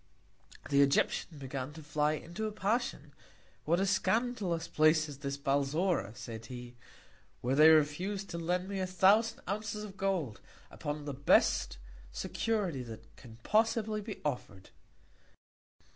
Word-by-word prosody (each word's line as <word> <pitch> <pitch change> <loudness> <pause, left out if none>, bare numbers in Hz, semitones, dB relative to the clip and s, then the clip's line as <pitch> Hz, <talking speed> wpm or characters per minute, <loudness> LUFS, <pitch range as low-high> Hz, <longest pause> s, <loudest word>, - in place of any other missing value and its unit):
The 140 0 +5
Egyptian 140 +3 +2
began 135 0 -5
to 160 0 -10
fly 150 +1 +1
into 175 +8 -4
a - - -4
Passion; 215 +4 -2 0.5
what 170 +3 +2
a 195 - +2
scandalous 200 -4 0
Place 155 0 +3
is 140 -2 -9
this 140 -1 -3
Balzora, 140 - 0
said 115 -2 -8
he, 125 -1 -9 0.7
where 125 +2 0
they 155 +2 +8
refuse 160 +6 +2
to 170 -4 -6
lend 180 +2 -1
me 200 -1 -3
a 185 - -1
thousand 200 +5 +3
Ounces 210 +2 -3
of 200 -2 -9
Gold, 180 - -1 0.3
upon 145 0 -5
the 145 - -4
best 135 - +3 0.3
Security 200 - -1
that 115 -2 -10
can 115 -3 -13
possibly 215 -1 +1
be 210 0 -7
offer'd. 125 -9 -4
160 Hz, 140 wpm, -32 LUFS, 140-200 Hz, 0.7 s, they